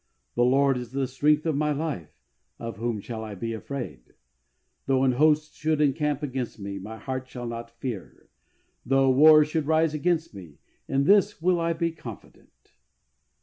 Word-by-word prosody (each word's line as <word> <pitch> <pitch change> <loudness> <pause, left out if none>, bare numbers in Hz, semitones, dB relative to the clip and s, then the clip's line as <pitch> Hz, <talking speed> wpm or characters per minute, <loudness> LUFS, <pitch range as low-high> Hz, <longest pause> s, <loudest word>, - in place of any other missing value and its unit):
The 120 - +2
Lord 135 +1 +3
is 125 0 -9
the 135 0 0
strength 150 +4 +1
of 160 -3 +1
my 150 +1 +1
life; 145 - -4 0.3
of 115 -4 -6
whom 115 -2 -2
shall 110 +1 -6
I 105 -2 -7
be 115 +4 -4
afraid? 110 - -7 0.7
Though 135 -1 +2
an 130 - +4
host 150 +3 +2
should 155 -1 -1
encamp 150 0 +1
against 130 -4 -4
me 100 -1 -5
my 110 +4 -8
heart 130 +1 -5
shall 125 -1 -7
not 115 0 -7
fear; 120 -8 -6 0.6
though 135 +1 +3
war 155 +3 +7
should 155 -1 -2
rise 160 0 +2
against 165 0 0
me, 85 -7 -12 0.3
in 135 +1 +1
this 200 +5 +4
will 175 +1 +2
I 165 0 +1
be 165 0 -1
confident." 125 -10 -13
135 Hz, 170 wpm, -26 LUFS, 115-155 Hz, 0.7 s, war